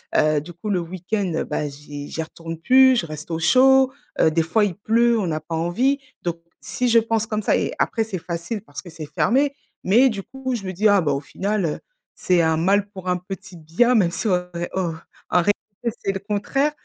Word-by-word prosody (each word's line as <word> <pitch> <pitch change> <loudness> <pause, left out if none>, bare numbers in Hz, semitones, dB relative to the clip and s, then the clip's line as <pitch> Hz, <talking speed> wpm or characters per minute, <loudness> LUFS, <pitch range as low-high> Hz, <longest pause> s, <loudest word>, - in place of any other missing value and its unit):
Heu, 155 -1 +3
du 175 - -10
coup 175 +6 -6
le 190 -3 +1
week-end 180 +1 -2
bah 150 - -2
j'y 145 0 -9
j'y 160 - -3
retourne 165 +1 -8
plus, 260 +9 +6
je 170 - -7
reste 155 +1 -8
au 165 - -1
chaud, 265 +7 +5 0.3
heu, 160 - +4
des 165 +1 +2
fois 210 +6 +2
il 190 -4 -3
pleut, 230 +3 +2
on 185 -5 -1
a 155 - -1
pas 165 +1 -6
envie, 240 - +1 0.2
donc 170 -1 -2 0.2
si 250 - -2
je 230 - +5
pense 225 -1 0
comme 215 -1 -2
ça - - +3
et - - -1
après 225 - +1
c'est 210 -4 -5
facile 170 +5 -4
parce 145 - -9
que 185 - -12
c'est 160 -2 -8
fermé, 270 - +1 0.3
mais 240 +8 +5
du 200 -4 -4
coup 265 -2 -4
je 215 - -5
me 185 - -4
dis: 210 +5 +2
«ah 205 -2 +5
bah 145 -4 0
au 140 - 0
final, 195 +6 -2
heu, 150 - -2 0.4
c'est 180 -2 +2
un 160 -1 +2
mal 200 +5 +2
pour 190 -2 -7
un 180 - +2
petit 190 0 -9
bien.» 170 +11 +2
même 180 -6 +3
si 220 - -3
en 180 -3 +2
ré 170 0 -3
en 175 -3 -1 0.4
en 180 - +4
réalité, 210 +4 -3
c'est 195 - +1
le 195 - -3
contraire 210 +9 0
190 Hz, 230 wpm, -22 LUFS, 165-225 Hz, 0.4 s, plus